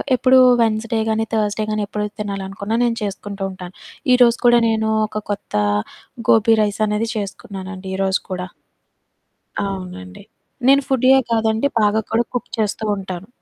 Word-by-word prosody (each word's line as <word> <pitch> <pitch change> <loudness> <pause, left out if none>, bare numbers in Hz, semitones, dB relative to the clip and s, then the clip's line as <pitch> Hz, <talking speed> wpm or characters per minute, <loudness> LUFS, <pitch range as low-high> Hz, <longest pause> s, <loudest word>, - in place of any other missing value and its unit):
ఎప్పుడూ 255 +1 +4 0.2
వెన్స్‌డే 225 +1 0
గానీ, 220 0 +1
థర్స్‌డే 215 -1 0
కానీ, 215 0 -1
ఎప్పుడు 210 +1 -3 0.2
తినాలనుకున్న, 200 0 -4
నేను 235 -1 +1
చేసుకుంటుంటాను. 195 -2 -5 0.4
ఈరోజు 240 -2 +5
కూడా 240 0 +7
నేను 220 -1 0 0.2
ఒక 215 0 -5
కొత్త 200 - -6 0.8
గోబీ 225 0 +5
రైసనేది 210 +1 0
చేసుకున్నానండి 195 -2 -6
ఈరోజు 190 0 +1
కూడా. 180 -1 -4 1.2
అవునండి. 180 - -7 0.4
నేను 275 +1 +6
ఫుడ్డీయే 265 0 +4
కాదండి, 225 +3 +1
బాగా 210 +1 +2
కూడా 225 +1 +2
కుక్ 245 - -4
చేస్తుంటాను. 200 -4 -2
210 Hz, 120 wpm, -20 LUFS, 195-225 Hz, 1.2 s, కూడా